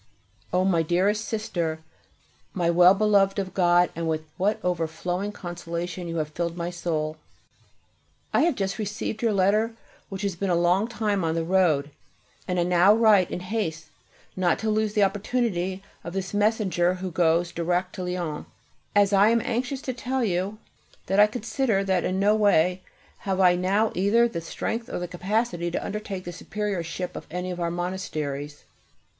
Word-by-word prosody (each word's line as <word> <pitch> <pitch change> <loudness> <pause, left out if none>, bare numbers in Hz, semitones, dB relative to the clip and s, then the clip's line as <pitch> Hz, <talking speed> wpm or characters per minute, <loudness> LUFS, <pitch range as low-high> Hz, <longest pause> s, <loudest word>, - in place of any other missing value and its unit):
O 185 +1 +2
my 175 -4 +3
dearest 190 +6 +1
Sister, 170 -7 -2 0.8
My 170 -2 +2
well 180 +2 +7
beloved 200 -1 +3
of 190 -2 -3
God, 175 -1 +3
with 160 -1 -2
what 210 +4 0
overflowing 180 +3 -2
consolation 175 -1 -5
you 165 - -4
have 155 -1 -1
filled 170 +2 -3
my 170 0 -3
soul! 155 -3 -2 1.2
I - - +4
have 330 -3 +2
just 195 0 -2
received 215 +1 -3
your 230 -2 +2
letter, 210 +3 +2 0.4
which 195 0 -6
has 200 -3 -1
been 195 +2 -2
a 175 - +3
long 175 +5 +2
time 210 -5 -1
on 160 0 0
the 165 - 0
road, 160 -5 +2 0.6
and 180 -1 0
I - - +3
now 180 +3 +5
write 215 -5 +5
in - - -4
haste 185 -5 -3 0.5
not 180 -3 +2
to 215 - +2
lose 215 -1 0
the 210 - +3
opportunity 195 -2 -1 0.2
of 170 - -7
this 190 0 -4
messenger 205 -4 +2
who 185 0 -5
goes 170 0 +2
direct 175 +2 -1
to 185 - -5
Lyons, 175 -4 -4 0.5
as 205 0 +4
I 200 +2 +6
am 235 +1 +3
anxious 255 +3 -2
to 255 - -3
tell 255 +1 -2
you 195 +1 -1 0.5
that 195 +2 +1
I 210 - +8
consider 220 -1 -1
that 190 -2 +1
in 185 +1 -1
no 205 +2 +4
way 185 -4 +3 0.4
have 190 -1 -2
I 180 -2 +6
now 195 +5 +1
either 210 +6 +3
the 170 -8 -5
strength 225 +7 -4
or - - -3
the 180 - -3
capacity 180 0 -1
to 170 - -3
undertake 200 -2 -5
the 175 - -6
superiorship 185 -2 -4
of - - -8
any 180 +2 -4
of 180 - -5
our 170 -1 0
monasteries. 155 -5 -4
185 Hz, 175 wpm, -25 LUFS, 175-210 Hz, 1.2 s, I